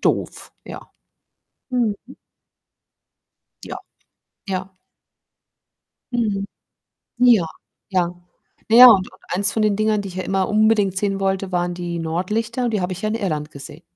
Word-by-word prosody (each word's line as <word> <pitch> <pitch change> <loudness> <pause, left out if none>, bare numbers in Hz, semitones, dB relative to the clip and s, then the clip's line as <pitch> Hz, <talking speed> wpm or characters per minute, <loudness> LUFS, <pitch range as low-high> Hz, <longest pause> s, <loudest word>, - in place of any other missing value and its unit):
doof, - - -2
ja. - - -10 0.8
Mhm. 240 -5 0 1.7
Ja, - - -6 0.7
ja. 190 0 -5 1.4
Mhm. 210 -5 -1 0.7
Ja, 235 -8 +5 0.4
ja, 180 -3 0 0.5
naja 240 +3 +10
und 200 -5 +6
und 185 - -20
eins 200 +2 +2
von 220 - 0
den 210 -2 +2
Dingern, 215 -1 +1
die 195 - -6
ich 180 - -10
ja 185 - -2
immer 190 0 0
unbedingt 210 -3 +2
sehen 195 0 -1
wollte, 195 0 -1
waren 175 0 -1
die 175 -1 -4
Nordlichter 210 +9 -2
und - - 0
die 210 - 0
habe 180 +1 -2
ich 180 - -7
ja 215 - 0
in 215 - -2
Irland 155 -9 -3
gesehen. 140 -2 -11
195 Hz, 140 wpm, -21 LUFS, 185-215 Hz, 1.7 s, naja